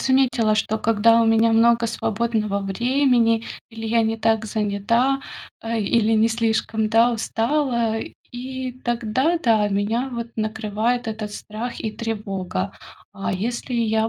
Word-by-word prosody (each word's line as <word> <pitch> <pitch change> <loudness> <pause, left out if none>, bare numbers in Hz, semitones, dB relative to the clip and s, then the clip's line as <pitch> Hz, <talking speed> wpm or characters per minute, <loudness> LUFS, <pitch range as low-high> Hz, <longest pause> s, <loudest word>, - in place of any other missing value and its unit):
заметила, 255 -5 +2
что 220 0 0
когда 230 +1 +4
у - - +2
меня 225 0 +4
много 230 +1 +4
свободного 215 -2 -1
времени, 235 +2 +2 0.3
или 225 0 -7
я 230 +1 +2
не 225 0 0
так 220 0 +1
занята, 220 +6 +1 0.4
э, 230 0 -2
или 225 +2 +2
не 220 0 +4
слишком, 225 -1 0
да, 230 +2 +4
устала, 235 0 0 0.3
и 260 +1 -5
тогда, 240 +8 0
да, 220 -8 +2
меня 215 +6 -1
вот 235 0 -4
накрывает 220 +2 -1
этот 215 -1 -4
страх 220 +4 -6
и 215 - -3
тревога. 195 -4 -4 0.4
А 195 -1 -3
если 235 +6 -3
я 220 -1 +1
225 Hz, 135 wpm, -22 LUFS, 215-235 Hz, 0.4 s, когда